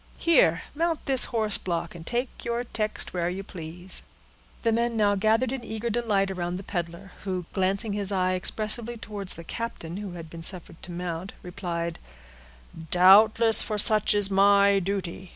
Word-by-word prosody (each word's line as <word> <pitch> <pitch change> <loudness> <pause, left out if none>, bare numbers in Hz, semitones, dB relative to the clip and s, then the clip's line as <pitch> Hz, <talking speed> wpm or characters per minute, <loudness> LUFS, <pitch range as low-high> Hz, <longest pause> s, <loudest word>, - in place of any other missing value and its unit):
Here, 180 - +3
mount 330 +1 -2
this 265 -3 +3
horseblock, 190 -7 -1
and 165 -1 -12
take 245 +1 -3
your 235 0 -2
text 215 -3 -3
where 175 -1 -1
you 190 +2 -5
please." 175 0 -7 0.6
The 230 - +2
men 235 0 0
now 205 -1 +3
gathered 220 +5 +1
in 265 -2 -5
eager 220 +2 -4
delight 205 -4 0
around 175 -1 -4
the 190 - -8
peddler, 175 +1 -6
who, 185 -3 -3
glancing 195 +3 0
his 200 -1 +1
eye 185 -1 +1
expressively 215 +5 -1
towards 205 -4 -4
the 170 - -10
captain, 175 -4 -6
who 200 -3 -7
had 165 -2 -9
been 165 +1 -10
suffered 170 -1 +3
to 180 - -9
mount, 175 +1 -5
replied,— 170 -2 -5 0.9
"Doubtless, 215 +5 +6
for 215 - 0
such 210 0 +4
is 205 -1 +2
my 200 0 +4
duty. 185 -1 -4
195 Hz, 165 wpm, -26 LUFS, 180-220 Hz, 0.9 s, Doubtless